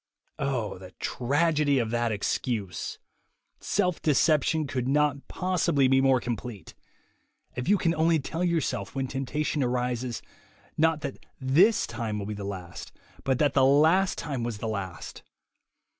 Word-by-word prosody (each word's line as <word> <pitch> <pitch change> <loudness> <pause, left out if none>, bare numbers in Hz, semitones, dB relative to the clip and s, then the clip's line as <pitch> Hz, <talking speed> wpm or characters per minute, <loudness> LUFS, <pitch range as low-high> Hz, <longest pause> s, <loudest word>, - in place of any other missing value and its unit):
Oh, 125 -9 -2
the 95 -1 -10
tragedy 145 +2 +1
of 115 -3 0
that 120 -1 0
excuse! 105 -3 -2 0.6
Self 180 -4 0
deception 155 +1 +2
could 130 -2 -2
not 145 0 +1
possibly 175 -7 +1
be 135 0 +4
more 135 -1 +4
complete. 115 -5 -6 0.8
If 125 +5 -3
you 205 - +5
can 165 -3 +1
only 165 0 +3
tell 160 +4 -3
yourself, 170 -5 -1
when 135 -1 -1
temptation 135 +3 -2
arises, 125 -1 -1 0.5
not 160 -1 +2
that 140 -2 -6 0.2
this 165 +12 +4
time 110 -3 -4
will 100 - -4
be 105 - -4
the 100 -1 -6
last^ 90 -4 -7 0.3
but 130 -2 +1
that 145 -1 +2
the 135 - +4
last 160 +8 +4
time 145 -7 -3
was 115 -3 -3
the 110 - -4
last! 100 -5 -5
135 Hz, 145 wpm, -27 LUFS, 120-155 Hz, 0.8 s, you